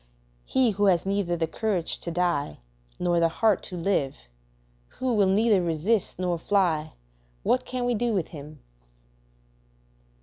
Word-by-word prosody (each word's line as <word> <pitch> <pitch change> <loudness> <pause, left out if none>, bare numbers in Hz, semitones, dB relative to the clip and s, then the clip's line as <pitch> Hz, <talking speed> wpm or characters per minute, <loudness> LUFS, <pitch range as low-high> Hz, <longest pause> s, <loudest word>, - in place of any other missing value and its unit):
He 255 -3 +3
who 205 +1 0
has 180 -3 +3
neither 195 -3 0
the 165 - +1
courage 180 0 -2
to - - -5
die 170 -4 -1 0.4
nor 175 -1 +1
the 165 0 +3
heart 210 +3 +2
to 185 - -7
live, 165 -6 0 0.8
who 255 -1 0
will 205 -3 +3
neither 205 0 +3
resist 175 +5 0
nor 175 -2 -1
fly, 165 -6 +1 0.5
what 255 - +1
can 250 -1 -2
we 245 - +1
do 240 +1 0
with 190 -7 -1
him? 150 -2 -10
185 Hz, 145 wpm, -26 LUFS, 165-210 Hz, 0.8 s, He